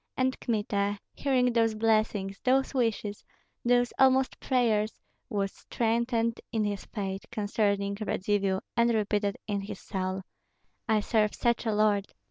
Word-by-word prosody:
And 260 Hz, 0 st, +2 dB
Kmita, 205 Hz, -2 st, 0 dB, 0.2 s
hearing 250 Hz, -3 st, +2 dB
those 225 Hz, -2 st, +2 dB
blessings, 215 Hz, -3 st, +1 dB
those 265 Hz, +2 st, +2 dB
wishes, 225 Hz, -5 st, -1 dB, 0.4 s
those 245 Hz, 0 st, +3 dB
almost 265 Hz, 0 st, +4 dB
prayers, 225 Hz, -5 st, +1 dB, 0.3 s
was 195 Hz, -2 st, -1 dB
strengthened 230 Hz, 0 st, -1 dB
in 220 Hz, -2 st, +1 dB
his 205 Hz, -1 st, -2 dB
faith 195 Hz, -2 st, -4 dB
concerning 205 Hz, -2 st, 0 dB
Radzivill, 195 Hz, -2 st, 0 dB
and 235 Hz, 0 st, +4 dB
repeated 205 Hz, -1 st, 0 dB
in 205 Hz, -1 st, -2 dB
his 195 Hz, -, -7 dB
soul, 190 Hz, -1 st, -3 dB, 0.7 s
"I 215 Hz, -1 st, +4 dB
serve 210 Hz, -1 st, +1 dB
such 235 Hz, 0 st, +1 dB
a -, -, +2 dB
lord! 210 Hz, -2 st, +2 dB
215 Hz, 130 wpm, -29 LUFS, 200-235 Hz, 0.7 s, almost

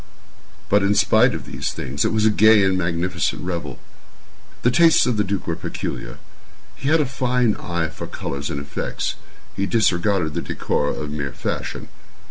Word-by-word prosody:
But, 105 Hz, +1 st, +3 dB
in 100 Hz, +1 st, +2 dB
spite -, -, +4 dB
of -, -, -6 dB
these -, -, -3 dB
things, 70 Hz, +3 st, -3 dB
it -, -, +1 dB
was 110 Hz, -1 st, +1 dB
a 110 Hz, -, +5 dB
gay 110 Hz, 0 st, +6 dB
and 95 Hz, -1 st, +2 dB
magnificent 90 Hz, 0 st, -1 dB
revel. 85 Hz, -8 st, -4 dB, 0.9 s
The 125 Hz, -, +4 dB
tastes 165 Hz, +4 st, +5 dB
of 125 Hz, -2 st, +1 dB
the 105 Hz, -, +2 dB
duke 100 Hz, -1 st, -3 dB
were 85 Hz, -, -2 dB
peculiar. -, -, -5 dB, 0.6 s
He 135 Hz, -, -2 dB
had 160 Hz, 0 st, +4 dB
a -, -, +1 dB
fine 125 Hz, -3 st, +1 dB
eye 85 Hz, -2 st, -2 dB
for -, -, -7 dB
colors 70 Hz, 0 st, -5 dB
and 70 Hz, -, -3 dB
effects. 70 Hz, 0 st, -3 dB, 0.4 s
He 100 Hz, -, -1 dB
disregarded 95 Hz, -6 st, +1 dB
the -, -, -2 dB
decora 75 Hz, -, -1 dB
of 75 Hz, -1 st, -5 dB
mere 70 Hz, -3 st, -4 dB
fashion. -, -, -4 dB
95 Hz, 175 wpm, -22 LUFS, 80-110 Hz, 0.9 s, gay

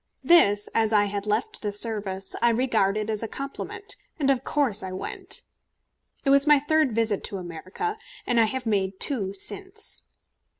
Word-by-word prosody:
This, 205 Hz, -12 st, +5 dB
as 220 Hz, -1 st, +2 dB
I 205 Hz, -1 st, +5 dB
had 200 Hz, 0 st, -4 dB
left 430 Hz, -, -1 dB
the 210 Hz, -, -2 dB
service, 200 Hz, -3 st, -2 dB
I 235 Hz, -, +5 dB
regarded 215 Hz, -4 st, +1 dB
as 215 Hz, -2 st, -1 dB
a 225 Hz, -, -2 dB
compliment, 395 Hz, -, -6 dB, 0.2 s
and 275 Hz, -4 st, +2 dB
of 265 Hz, -1 st, 0 dB
course 260 Hz, -10 st, +1 dB
I 190 Hz, -, -6 dB
went. 185 Hz, -, -2 dB, 0.8 s
It 275 Hz, -, +4 dB
was 280 Hz, +1 st, +5 dB
my 295 Hz, -1 st, +7 dB
third 295 Hz, -3 st, +1 dB
visit 225 Hz, -3 st, +1 dB
to 200 Hz, -, -4 dB
America, 185 Hz, -, -5 dB, 0.3 s
and 240 Hz, -, +2 dB
I 225 Hz, -, +6 dB
have 250 Hz, +3 st, -2 dB
made 195 Hz, -3 st, 0 dB
two 200 Hz, -8 st, +1 dB
since. 395 Hz, -, -2 dB
225 Hz, 170 wpm, -25 LUFS, 200-280 Hz, 0.8 s, my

